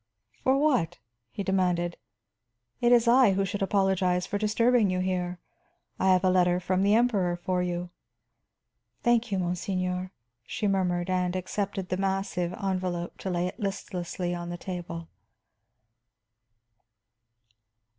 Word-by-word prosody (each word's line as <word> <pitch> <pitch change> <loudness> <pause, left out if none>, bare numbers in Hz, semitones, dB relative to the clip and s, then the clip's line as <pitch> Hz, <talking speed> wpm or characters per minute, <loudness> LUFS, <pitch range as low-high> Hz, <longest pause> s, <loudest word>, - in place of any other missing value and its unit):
"For 265 +1 +3
what?" 255 - +2 0.3
he 200 - -5
demanded. 180 -3 +1 0.8
"It 240 0 +3
is 240 -1 +5
I 240 -4 +6
who 195 +1 +1
should 200 +2 -4
apologize 190 -2 +2
for 205 - -3
disturbing 225 +1 +3
you 185 0 0
here. 180 -1 -1 0.6
I 190 - +4
have 185 0 +3
a 185 - +4
letter 180 -1 +3
from 185 +1 0
the 200 +2 +4
Emperor 205 -7 +2
for 180 +1 -1
you." 175 0 -3 1.1
"Thank 240 -1 +2
you, 195 - +1
monseigneur," 180 0 -2 0.3
she 210 - -2
murmured, 185 -2 0
and 180 -1 0
accepted 190 0 -3
the 185 - -1
massive 190 -2 -1
envelop 185 -2 -3
to 190 - -4
lay 175 -1 0
it 180 - -5
listlessly 180 -3 -3
on 175 0 -5
the 175 - -4
table. 170 -2 -6
185 Hz, 135 wpm, -28 LUFS, 180-200 Hz, 1.1 s, I